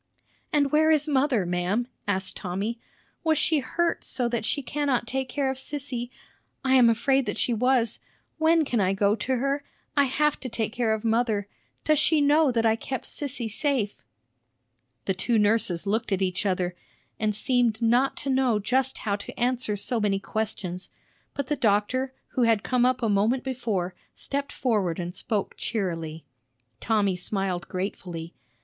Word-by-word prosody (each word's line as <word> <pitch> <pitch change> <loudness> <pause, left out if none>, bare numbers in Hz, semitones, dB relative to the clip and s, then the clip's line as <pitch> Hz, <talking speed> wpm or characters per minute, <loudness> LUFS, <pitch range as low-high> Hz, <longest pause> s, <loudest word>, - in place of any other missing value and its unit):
"And 285 -2 +2
where 315 +1 +4
is 305 -1 +3
mother, 265 -8 +2
ma'am?" 180 +7 0 0.2
asked 190 -1 0
Tommy. 200 +5 -3 0.4
"Was 320 -2 +3
she 315 0 +3
hurt 335 +5 -1
so 245 -2 -2
that 235 -2 -1
she 285 +5 -1
cannot 275 -3 0
take 265 +1 -2
care 270 0 0
of 265 - -5
Sissy? 265 -3 -4 0.6
I 260 - +3
am 250 -3 +7
afraid 265 +3 +2
that - - -2
she 245 - +1
was. 245 0 +2 0.4
When 320 0 +4
can 245 -4 0
I 190 -1 +2
go 200 +1 +2
to 260 +5 -1
her? 275 +3 0 0.3
I 285 -1 +5
have 300 +3 +1
to 255 - -5
take 225 -1 -2
care 235 -3 +1
of 220 +1 -7
mother. 225 -3 +1 0.4
Does 305 -2 +3
she 315 - +3
know 290 0 +4
that 230 -1 +1
I 220 0 +4
kept 260 +3 -5
Sissy 265 -5 -3
safe?" 230 - -1 1.0
The 195 - +1
two 225 +5 0
nurses 210 -4 +2
looked 220 +3 -1
at 195 0 +1
each 185 +2 -1
other, 180 -2 0 0.4
and 215 -1 0
seemed 240 -1 +1
not 240 +3 +2
to 275 - -2
know 260 -4 +3
just 255 +5 0
how 200 -3 -1
to 200 - -9
answer 245 -3 +1
so 215 +4 -1
many 205 -2 +1
questions; 195 -4 -3 0.5
but 280 - -2
the 295 - 0
doctor, 250 +2 +1 0.2
who 255 - -1
had 225 -3 +3
come 250 -1 +3
up 255 -1 0
a - - +3
moment 215 +5 +2
before, 220 -9 -2 0.2
stepped 280 0 -3
forward 200 -9 0
and 175 +1 -4
spoke 205 +1 -2
cheerily. 165 -7 -3 0.5
Tommy 205 -4 +1
smiled 185 -1 -2
gratefully. 180 -3 -5
235 Hz, 170 wpm, -26 LUFS, 200-265 Hz, 1.0 s, am